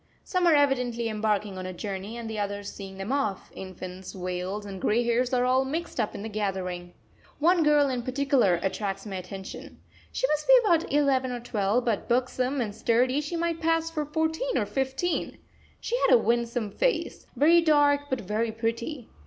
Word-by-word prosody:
Some 365 -2 +1
are 325 - +6
evidently 250 -5 +1
embarking 210 -2 -1
on 185 - -5
a 185 - -5
journey 200 +3 -5
and 235 -1 -6
the 220 -1 -4
others 205 0 -4
seeing 195 -1 -9
them 195 +5 -4
off; 270 -9 -1
infants, 185 0 -8
veils, 185 +2 -4
and 195 -2 -7
grey 230 +3 +2
hairs 240 +2 +1
are 250 -1 +2
all 260 +1 +3
mixed 315 +2 -4
up 215 - -1
in 200 - -6
the - - -4
gathering. 185 -4 -3 0.4
One 340 +3 +4
girl 295 -2 +4
in 255 -2 -1
particular 255 -6 +2
attracts 195 0 -2
my 195 -3 -5
attention. 190 +1 -8 0.3
She - - 0
must 300 0 -1
be - - +7
about 340 -4 +2
eleven 270 -3 +2
or 245 - -3
twelve; 230 0 0
but, 225 -1 -1
buxom 255 +2 0
and 210 -3 -3
sturdy, 250 +6 +2
she 300 +4 -4
might 335 -1 -1
pass 330 0 +1
for 305 -2 -2
fourteen 320 +10 -1
or - - +1
fifteen. 270 +6 -2 0.4
She 475 - -2
has - - +5
a - - +9
winsome 235 -1 0
face - - -1
very 335 +4 +5
dark, 290 -2 +3
but 260 - -1
very 215 +3 -1
pretty. 230 +4 -3
240 Hz, 185 wpm, -27 LUFS, 205-285 Hz, 0.4 s, a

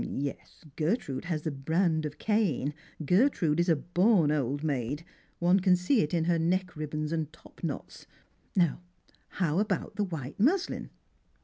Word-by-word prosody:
" - - -3 0.2
Yes, 140 - -10
Gertrude 155 - -1
has 160 -3 -2
the 160 - -1
brand 160 +3 +1
of 150 - -10
Cain— 195 - +1 0.3
Gertrude 180 - +3
is 175 +1 +2
a 165 - +5
born 175 +1 +3
old 145 0 -1
maid; 145 +1 -2 0.3
one 180 +3 +4
can 185 -1 +4
see 180 +8 +2
it 150 - -1
in 170 -2 +1
her 170 0 +2
neck 180 +2 0
ribbons 155 0 -3
and 160 -2 -2
top 155 - -18
knots. - - -5 0.5
Now, 175 -3 +2 0.6
how 170 -2 +1
about 205 -2 -1
the 210 - +2
white 160 -7 -5
muslin 350 - +1
165 Hz, 165 wpm, -29 LUFS, 150-185 Hz, 0.6 s, a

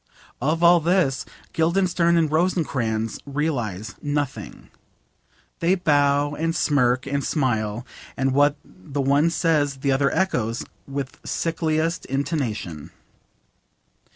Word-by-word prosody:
Of 160 +6 0
all 170 0 +7
this 165 -5 +1 0.3
Guildenstern 170 0 +2
and 160 -3 +2
Rosencrantz 135 - 0
realise 125 - -3
nothing. 145 -2 -4 0.9
They 175 +3 +3
bow 145 -4 +2
and 165 +2 -1
smirk 130 -4 +2
and 140 0 -1
smile, 115 -6 -1 0.3
and 135 0 +1
what 145 +2 +4
the 135 +10 -8
one 140 +4 +3
says 155 -4 +1
the 135 +1 -1
other 140 +1 +2
echoes 120 - -1 0.2
with 135 -1 -5
sickliest 165 0 -1
intonation. 130 - -3
145 Hz, 105 wpm, -23 LUFS, 130-165 Hz, 0.9 s, all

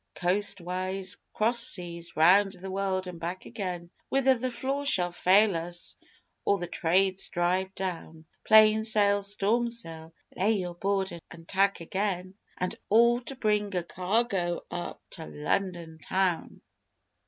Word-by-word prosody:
_Coastwise 185 0 -1
cross 235 +3 +1
seas 170 -7 -1
round 190 +5 +5
the 190 0 -7
world 190 -1 -1
and 180 -2 -8
back 175 +3 -5
again, 180 -6 -5 0.2
Whither 270 -1 +4
the 255 +1 -2
flaw 270 +3 -3
shall 180 -11 +3
fail 195 +3 +4
us 175 +1 -4 0.5
or 200 - +2
the 175 - -4
Trades 185 +3 +1
drive 185 +2 0
down: 165 -4 -5 0.2
Plain 215 0 +6
sail 205 -2 +2
storm 210 +4 0
sail 165 -9 -6 0.2
lay 205 +4 +2
your 180 -4 -3
board 195 +2 -1 0.2
and 165 0 -13
tack 195 -1 +1
again 185 +1 -2 0.2
And 180 - -2
all 235 +3 +5
to 270 +2 -7
bring 210 -4 0
a 180 - 0
cargo 185 -1 -1
up 85 -1 -5
to - - -7
London 160 - -3
Town! 185 0 -1
190 Hz, 140 wpm, -28 LUFS, 175-210 Hz, 0.5 s, Plain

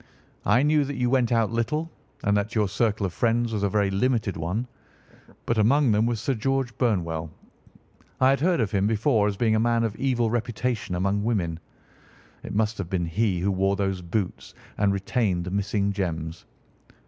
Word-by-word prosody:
I 115 +7 +4
knew 150 0 +3
that 140 +1 -4
you 125 -1 0
went 125 -3 +2
out 115 -2 +2
little, 150 +8 -1 0.3
and 100 0 +2
that 105 +3 -1
your 105 -2 +2
circle 105 +1 0
of 90 - -3
friends 120 +1 +1
was 105 - -1
a 100 - +1
very 100 -1 +1
limited 110 -1 0
one. 90 +9 -2 0.8
But 115 -1 0
among 130 +4 +4
them 105 +2 +3
was 120 -2 -1
Sir 135 +5 0
George 130 +1 -1
Burnwell. 85 -9 0 0.9
I 130 0 +5
had 135 - +1
heard 175 +2 +2
of 105 -4 -1
him 100 0 +1
before 110 0 +2
as 100 -1 -2
being 110 -1 +2
a 110 - +3
man 115 0 +2
of 110 -2 -2
evil 120 -4 +1
reputation 120 -4 -2
among 100 +3 0
women. 90 -8 -1 0.8
It - - -7
must 110 0 0
have 90 -4 -4
been 90 -2 -1
he 95 +2 0
who 100 +2 +1
wore 95 +1 +1
those 95 -2 -1
boots 90 +2 -4 0.2
and 100 -1 +3
retained 100 -2 0
the 90 - -5
missing 100 0 0
gems. 85 -4 -4
110 Hz, 190 wpm, -25 LUFS, 95-120 Hz, 0.9 s, I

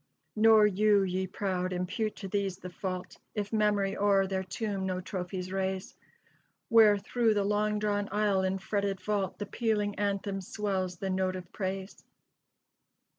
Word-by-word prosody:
"Nor 220 0 +6
you, 205 0 +4
ye 190 0 -1
proud, 185 -1 -2
impute 185 +4 -2
to 195 - -7
these 195 -1 -1
the 185 -1 -8
fault, 185 0 -5 0.2
If 210 0 -3
memory 205 -2 +2
o'er 200 -1 +3
their 190 0 -1
tomb 195 0 -3
no 185 -1 -1
trophies 185 0 -5
raise, 190 0 -2 0.7
Where 220 -2 +7
through 225 +2 +1
the 205 - +2
long 210 +1 +1
drawn 205 -1 -1
aisle 205 -2 +2
and 190 0 0
fretted 200 0 -1
vault 200 -2 -1
The 205 - -4
pealing 210 -2 0
anthem 200 -1 -1
swells 190 -2 -2
the 190 +2 -3
note 185 0 0
of 180 -1 -8
praise." 190 0 -4
195 Hz, 155 wpm, -30 LUFS, 190-210 Hz, 0.7 s, Where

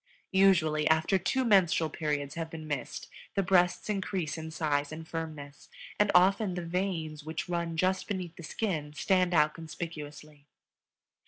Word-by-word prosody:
Usually, 170 -6 +4
after 160 +5 +3
two 260 +9 0
menstrual 175 -7 +4
periods 150 -3 -2
have 165 -1 -4
been 160 -1 -8
missed 150 -2 -4 0.3
the 195 - +2
breasts 180 -1 +3
increase 190 -6 -2
in 160 -1 -6
size 145 -3 -1
and 160 +1 -7
firmness, 155 -4 -7 0.3
and 210 0 +4
often 190 +1 +4
the 175 -1 -4
veins 165 -4 -2
which 160 +2 -4
run 170 -2 -2
just 185 +3 +1
beneath 180 -4 -4
the - - -10
skin 155 -3 -3
stand 185 +3 +2
out 150 -2 +4
conspicuously. 150 -2 -8
165 Hz, 150 wpm, -30 LUFS, 155-185 Hz, 0.3 s, Usually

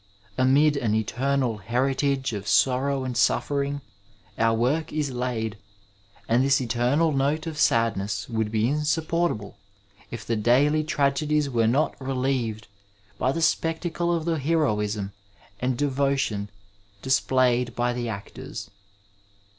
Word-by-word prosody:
Amid 140 +3 +4
an 110 -5 0
eternal 125 +2 0
heritage 130 +4 0
of 100 -1 -5
sorrow 135 +5 +2
and 130 -1 -4
suffering 140 +4 +1 0.6
our 115 0 +3
work 150 +7 0
is 150 -3 -1
laid, 115 -4 -3 0.7
and 120 +3 +3
this 140 +1 +3
eternal 125 +6 +1
note 145 +3 0
of 160 -2 -5
sadness 100 -6 +1
would 110 -2 -1
be 110 0 +1
insupportable 150 -6 -1 0.5
if 115 -2 -7
the 115 - 0
daily 135 +8 +3
tragedies 150 0 +1
were 115 -2 +2
not 140 +5 +1
relieved 125 -4 -1 0.5
by 130 - +2
the 165 +4 -2
spectacle 165 +2 0
of 165 -2 -1
the 165 -2 0
heroism 105 -10 0 0.5
and 125 -1 -1
devotion 135 -7 0 0.5
displayed 125 -2 +2
by 120 0 0
the 120 -1 -3
actors. 100 -2 -7
130 Hz, 125 wpm, -25 LUFS, 115-145 Hz, 0.7 s, Amid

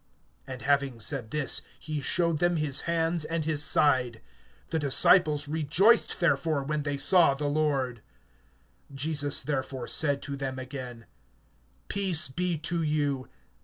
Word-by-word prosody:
(20)And 130 -2 -8
having 140 -4 0
said 115 0 -4
this, 145 +1 0 0.2
he 155 -2 -5
showed 170 +1 0
them 175 +1 +1
his 150 -4 +3
hands 165 0 -1
and 165 0 -3
his 155 -2 +1
side. 130 -7 +2 0.5
The 160 - 0
disciples 150 +1 +3
rejoiced 160 +10 +2
therefore, 160 -3 0
when 150 +2 -3
they 145 -1 -3
saw 155 0 +4
the 145 +2 -5
Lord. 140 -5 -1 0.9
(21)Jesus 145 +1 0
therefore 135 -3 -4
said 145 -3 -1
to 140 - -5
them 135 -1 -5
again: 125 -3 -8 0.8
Peace 180 -8 +4
be 175 +4 -2
to 165 +2 -3
you. 145 -4 -2
145 Hz, 135 wpm, -27 LUFS, 135-160 Hz, 0.9 s, saw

